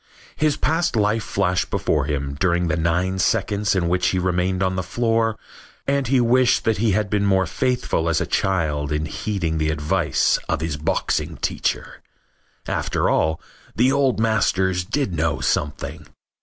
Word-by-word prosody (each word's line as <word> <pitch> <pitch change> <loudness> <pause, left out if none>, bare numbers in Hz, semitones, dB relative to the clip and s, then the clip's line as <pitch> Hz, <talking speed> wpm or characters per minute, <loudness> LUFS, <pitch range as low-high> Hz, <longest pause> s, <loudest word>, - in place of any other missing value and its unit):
His 150 -1 +1
past 165 -2 0
life 105 +1 +1
flashed 95 -2 0
before 75 -3 0
him 70 -2 -2
during 85 -1 +1
the 75 - +1
nine 90 +4 0
seconds 105 -1 +1
in 85 -3 +1
which 90 +1 +1
he 95 - +1
remained 90 +1 0
on 95 0 0
the 95 - -1
floor 115 +4 0 0.5
and 140 -2 0
he 130 +1 +3
wished 125 +1 +3
that 110 -3 +1
he 110 -2 +2
had 105 +1 +1
been 100 0 0
more 95 -1 +3
faithful 90 -3 -1
as 80 -1 +2
a - - -1
child 75 -6 0
in 75 +1 -1
heeding 85 -2 -2
the 80 0 +1
advice 75 -1 +1
of - - 0
his 80 -2 -2
boxing 75 +1 -1
teacher. - - -2 0.7
After - - 0
all, 80 0 +1 0.4
the 125 +4 +3
old 135 -4 +2
masters 95 -5 +1
did 115 +1 -2
know 80 -1 0
something. 75 +1 -2
95 Hz, 165 wpm, -22 LUFS, 80-115 Hz, 0.7 s, he